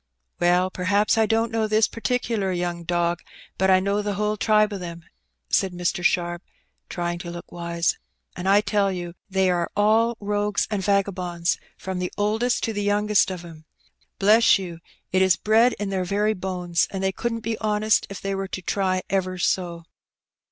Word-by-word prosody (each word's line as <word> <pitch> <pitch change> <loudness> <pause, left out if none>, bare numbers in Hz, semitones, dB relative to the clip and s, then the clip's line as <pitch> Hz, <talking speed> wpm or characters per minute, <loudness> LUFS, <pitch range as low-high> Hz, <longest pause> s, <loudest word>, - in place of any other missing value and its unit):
" - - -50
Well, 180 +1 +3
perliaps 200 +4 +2
I 220 -1 +3
don't 225 +1 +1
know 225 -1 0
this 215 0 +3
particular 230 -4 -1
young 175 -1 -2
dog, 175 0 0 0.4
but 190 - +3
T 190 -1 +5
know 200 +2 0
the 205 -1 -2
whole 210 +1 0
tribe 215 0 +3
of 200 - -4
them," 170 -2 -7 0.5
said 190 -2 +2
Mr. 175 0 -2
Sharp, 175 0 +1 0.5
fay 175 -1 -2
ing 175 - -6
to 175 -1 -7
look 170 0 -9
wise, 170 -1 -1 0.4
"and 185 +2 -2
I 200 +1 +6
tell 205 -1 +1
yon 175 -2 -5 0.2
they 190 -1 +2
are 175 -1 0
all 220 +3 +3
rogues 205 0 0
and 205 -2 -1
TagaboudB, 185 -3 0 0.2
from 190 -1 -5
the 180 0 -3
oldest 220 +4 0
to 225 - -1
the 205 - -2
youngest 205 0 +2
of 180 -2 -6
'em. 160 -2 -12 0.5
Bless 215 +4 +5
you, 175 -4 -7 0.3
it 185 - +2
is 190 -1 +5
bred 225 +3 +3
in 205 -1 -4
their 190 -1 0
very 210 +3 +1
bones, 180 -3 -1
and 195 -1 -4
they 190 - +2
couldn't 230 +3 -3
be 225 +1 -2
honest 215 0 +1
if 195 - -7
they 195 0 -2
were 195 0 -3
to 190 - -5
try 185 0 0
ever 185 -1 -1
so." 175 -1 -1
195 Hz, 190 wpm, -24 LUFS, 175-210 Hz, 0.5 s, I